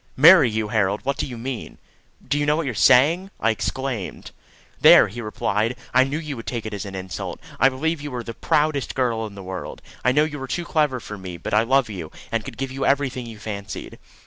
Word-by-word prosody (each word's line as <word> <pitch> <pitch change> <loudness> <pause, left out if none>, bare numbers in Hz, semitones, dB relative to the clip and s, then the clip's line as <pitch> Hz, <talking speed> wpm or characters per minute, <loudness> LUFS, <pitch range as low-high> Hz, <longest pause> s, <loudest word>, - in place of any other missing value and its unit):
"Marry 160 -1 +8
you, 110 -1 -2
Harold! 105 -2 +1
What 140 0 0
do - - -2
you 125 -3 -7
mean? 125 0 -6 0.5
Do 145 - +1
you 145 - +1
know 150 - +4
what 165 0 -1
you 130 - -1
are - - -7
saying?" 145 - +4
I 115 - +3
exclaimed. 120 -2 -4 0.5
"There!" - - +8
he 120 +5 -7
replied: 110 +1 -1 0.2
"I 130 +1 +5
knew 140 +3 -2
you 150 -3 -5
would 115 - -9
take 120 -3 -3
it 110 - -5
as 100 0 -4
an 100 -1 -7
insult. 95 -1 -5 0.2
I 135 - +6
believe 155 +4 -2
you 145 0 -6
are 120 - -4
the 115 - -6
proudest 150 +2 0
girl 115 -4 0
in 100 - -12
the 100 - -9
world. 95 0 -6 0.2
I 125 - +4
know 145 +3 +4
you 150 -2 -4
are 135 - -5
too 175 +5 -3
clever 150 -6 +1
for 105 -3 -8
me; 90 -2 -7
but - - -6
I 105 - +5
love 130 +2 +2
you, 90 -7 -7 0.2
and 115 -1 -1
could - - -9
give 135 0 -3
you 135 +1 -4
everything 135 -3 0
you 115 -2 -9
fancied." 100 -2 -7
125 Hz, 240 wpm, -23 LUFS, 110-140 Hz, 0.5 s, Marry